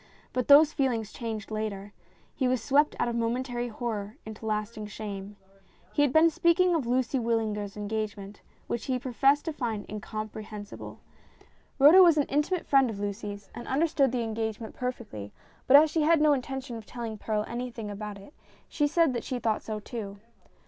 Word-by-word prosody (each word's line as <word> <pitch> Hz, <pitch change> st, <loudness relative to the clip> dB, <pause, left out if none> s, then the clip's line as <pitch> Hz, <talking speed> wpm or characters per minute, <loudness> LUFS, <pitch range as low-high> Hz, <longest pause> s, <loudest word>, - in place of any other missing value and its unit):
But 255 Hz, -2 st, -1 dB
those 295 Hz, +2 st, +7 dB
feelings 240 Hz, -7 st, -1 dB
changed 225 Hz, -3 st, -5 dB
later. 205 Hz, -2 st, -4 dB, 0.4 s
He 260 Hz, -, 0 dB
was 255 Hz, 0 st, +1 dB
swept 290 Hz, +4 st, +3 dB
out -, -, 0 dB
of 235 Hz, -, -2 dB
momentary 240 Hz, +1 st, -1 dB
horror 220 Hz, -1 st, -4 dB
into 220 Hz, 0 st, -8 dB
lasting 215 Hz, 0 st, -3 dB
shame. 205 Hz, -1 st, -7 dB, 0.6 s
He -, -, +2 dB
had 290 Hz, -3 st, +3 dB
been 320 Hz, +3 st, +5 dB
speaking 345 Hz, +3 st, +3 dB
of 300 Hz, -8 st, 0 dB
Lucy 255 Hz, +1 st, +1 dB
Wyllinger's 220 Hz, -3 st, -1 dB
engagement, 210 Hz, -1 st, -4 dB, 0.2 s
which 235 Hz, -, -3 dB
he 260 Hz, -2 st, 0 dB
professed 270 Hz, +3 st, +2 dB
to 325 Hz, -, -2 dB
find 225 Hz, -7 st, -3 dB
incompre 215 Hz, +1 st, -6 dB
hensible. 205 Hz, -1 st, -9 dB, 0.8 s
Rhoda 300 Hz, +7 st, +8 dB
was 340 Hz, -4 st, +6 dB
an 290 Hz, -, +3 dB
intimate 300 Hz, +5 st, 0 dB
friend 270 Hz, -3 st, +4 dB
of 210 Hz, -3 st, -6 dB
Lucy's, 205 Hz, 0 st, -5 dB
and 240 Hz, -, -8 dB
understood 280 Hz, -2 st, +2 dB
the 250 Hz, -1 st, -1 dB
engagement 220 Hz, 0 st, -4 dB
perfectly, 230 Hz, -, -5 dB, 0.4 s
but 275 Hz, -, +9 dB
as 305 Hz, +1 st, +5 dB
she 320 Hz, -, +1 dB
had 320 Hz, +1 st, +4 dB
no 300 Hz, -1 st, +5 dB
intention 265 Hz, -2 st, -4 dB
of 220 Hz, -, -11 dB
telling 230 Hz, -3 st, -6 dB
Perral 215 Hz, 0 st, -1 dB
anything 240 Hz, -2 st, -5 dB
whatever 205 Hz, -1 st, -6 dB
about 200 Hz, -, -9 dB
it, 200 Hz, +9 st, -14 dB, 0.3 s
she 295 Hz, -2 st, +1 dB
said 320 Hz, -2 st, +3 dB
that 240 Hz, -, -3 dB
she 255 Hz, -, -3 dB
thought 225 Hz, -3 st, 0 dB
so, 215 Hz, -1 st, -5 dB
too. 205 Hz, -2 st, -7 dB
235 Hz, 180 wpm, -28 LUFS, 215-275 Hz, 0.8 s, but